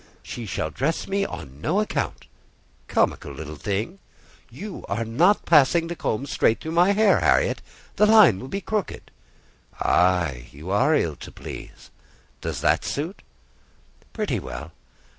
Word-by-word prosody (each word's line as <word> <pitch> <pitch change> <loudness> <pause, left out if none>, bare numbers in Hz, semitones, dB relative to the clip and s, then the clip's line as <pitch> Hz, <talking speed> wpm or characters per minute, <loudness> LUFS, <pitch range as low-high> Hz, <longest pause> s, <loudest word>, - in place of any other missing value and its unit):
"She 120 -3 -7
shall 80 -4 -2
dress 145 - -1
me 200 0 0
on 70 +2 -9
no 180 - +1
account." 215 - -2 0.6
"Comical 70 - 0
little 75 +2 -7
thing!" 105 - -3 0.5
"You 205 -1 -8
are 110 +4 -1
not 170 - +3
passing 165 +1 +5
the 175 - -3
comb 130 -3 -2
straight 115 -4 +1
through 160 - -6
my 175 +4 +4
hair, 215 0 +4
Harriet; - - +2 0.4
the 210 - +5
line 210 - +7
will 130 - -7
be 195 +8 -4
crooked." 210 -2 -4 0.7
"Ay, 85 -8 +2
you 80 +6 -8
are 125 +10 +3
ill 80 - 0
to - - -10
please. - - -10 0.5
Does - - -4
that - - +2
suit?" 160 +8 -4 0.9
"Pretty - - -2
well. 60 -2 -7
135 Hz, 145 wpm, -24 LUFS, -, 0.9 s, line